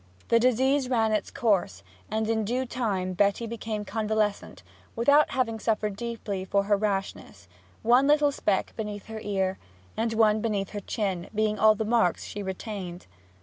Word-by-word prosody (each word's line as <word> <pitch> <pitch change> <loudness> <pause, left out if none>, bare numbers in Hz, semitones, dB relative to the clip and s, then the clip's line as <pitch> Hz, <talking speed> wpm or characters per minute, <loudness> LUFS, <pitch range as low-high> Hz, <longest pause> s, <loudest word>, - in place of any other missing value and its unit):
The 230 - +5
disease 255 +2 +2
ran 225 -3 +2
its 215 -1 0
course, 180 - 0 0.3
and 220 +1 -1
in 220 -1 +1
due 250 +5 -1
time 200 -7 -2
Betty 200 +5 +1
became 220 -2 -4
convalescent, 215 -2 -2 0.3
without 285 +6 +4
having 230 -4 -1
suffered 215 -2 -1
deeply 215 -4 -4
for 200 +1 +1
her 205 +1 +2
rashness, 195 - -3 0.4
one 245 +4 +5
little 295 0 +4
speck 205 -8 -1
beneath 210 -2 -5
her 220 0 -7
ear, 190 -3 -1 0.4
and 225 +1 -1
one 220 -1 +3
beneath 205 -4 -1
her 205 - -4
chin, 190 -3 -3
being 215 0 +1
all 215 0 +6
the 220 - -2
marks 225 -6 +2
she 205 - -6
retained. 190 -2 -6
215 Hz, 160 wpm, -27 LUFS, 200-230 Hz, 0.4 s, all